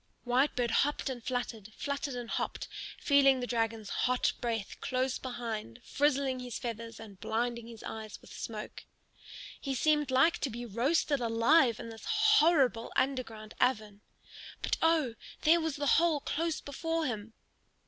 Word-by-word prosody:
Whitebird 245 -1 +2
hopped 290 +2 +1
and 245 -3 -7
fluttered, 225 -4 -4
fluttered 280 -1 -3
and 245 -1 -5
hopped, - - -3 0.3
feeling 275 -2 +5
the 250 - -2
dragon's 225 -3 -1
hot 250 0 +1
breath 225 -4 -2
close 255 0 -1
behind 230 - -5
frizzling 280 -2 +1
his 245 -2 -5
feathers 230 -1 -6
and 205 -4 -11
blinding 235 +1 -2
his 230 -2 -11
eyes 220 -1 -7
with - - -14
smoke. 215 -2 -7 0.7
He 275 -1 -3
seemed 295 +1 +2
like 265 +6 +4
to 275 - -1
be 240 +1 -6
roasted 270 +6 +1
alive 235 +2 +4
in 230 - -6
this 225 -1 -10
horrible 330 - +4
underground 225 -5 -1
oven. 215 -5 +1 0.6
But - - +1
oh, 320 -7 +3 0.3
there 335 +2 +5
was 320 -3 -1
the 290 - -2
hole 320 +1 +4
close 325 +3 -1
before 325 +3 -2
him! 225 -4 -4
250 Hz, 150 wpm, -31 LUFS, 225-285 Hz, 0.7 s, feeling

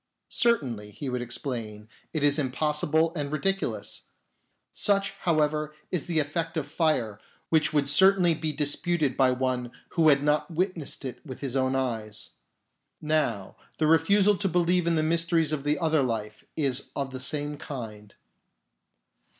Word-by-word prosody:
" - - -56
"Certainly," 130 - +1
he 130 +7 -6
would 125 -1 -2
exclaim, 115 -4 -4 0.2
"it 155 -3 -2
is 145 +1 +3
impossible 150 +4 +1
and 145 -4 -3
ridiculous. 195 +5 -1 0.3
" - - -47 0.2
Such, 200 -1 +1
however, 155 -2 0 0.2
is 180 -5 -2
the 170 -2 -1
effect 165 +3 -1
of 155 - -1
fire, 145 - 0 0.3
which 160 -2 +3
would 145 -2 +1
certainly 180 +3 +5
be 155 0 -2
disputed 150 -1 0
by 130 -1 +4
one 125 -1 -1 0.2
who 160 -2 +3
had 140 -1 +4
not 150 +3 +1
witnessed 175 -4 -2
it 125 -1 -6
with 130 -5 -9
his 135 -2 -4
own 130 0 +1
eyes. 110 -5 -3 0.7
Now, 150 -11 -1 0.2
the 155 - +1
refusal 195 +6 +4
to 195 0 -1
believe 175 0 +2
in 170 - +2
the 155 - +1
mysteries 165 -1 +1
of 150 -3 -2
the 145 +1 +1
other 160 -3 +2
life 110 -4 -3
is 140 -4 0
of 135 -1 -3
the 130 - -6
same 145 +2 -2
kind. 110 -8 -8
150 Hz, 160 wpm, -27 LUFS, 130-165 Hz, 0.7 s, certainly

